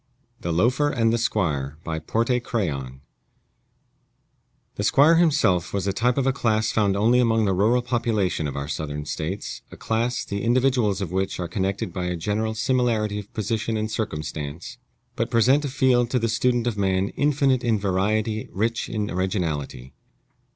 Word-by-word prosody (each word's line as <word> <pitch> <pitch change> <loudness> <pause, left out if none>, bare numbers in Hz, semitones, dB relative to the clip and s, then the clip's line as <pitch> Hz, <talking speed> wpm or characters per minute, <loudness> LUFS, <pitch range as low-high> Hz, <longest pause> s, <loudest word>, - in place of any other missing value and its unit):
THE 85 - -3
LOAFER 125 - +2
AND 115 -5 +1
THE 115 - +1
SQUIRE 75 - -1
BY 80 -1 -3
PORTE 115 +9 0
CRAYON 70 - -3 1.7
The - - -4
squire 155 +4 +5
himself 120 - +2
was 95 -2 -1
the 100 - 0
type 120 +5 +1
of 135 - +1
a 135 - +2
class 110 -4 +1
found 100 -3 +1
only 115 +5 +4
among 115 -2 +3
the 95 - +1
rural 110 +6 +2
population 110 -10 0
of 70 - -5
our 70 0 -4
Southern 75 0 -4
States 80 +7 -4
a - - -12
class, 115 +2 -1
the 100 0 -4
individuals 120 -4 +2
of 90 -4 -3
which 95 +1 -2
are 90 - -2
connected 95 0 -2
by 90 -2 -3
a 90 0 -1
general 105 +6 -2
similarity 110 -3 0
of 105 0 -10
position 110 +1 -1
and 110 0 -2
circumstance, 80 - -5 0.4
but 115 +1 -1
present 130 +6 +3
a - - -2
field 125 -3 +2
to 125 - +1
the 115 -1 0
student 120 +1 +1
of 115 -4 -2
man 95 0 +1
infinite 140 -3 +1
in 115 -3 +2
variety, 105 +3 -1
rich 115 +3 -1
in 105 -2 -2
originality. 80 -9 -3
110 Hz, 170 wpm, -24 LUFS, 95-120 Hz, 1.7 s, squire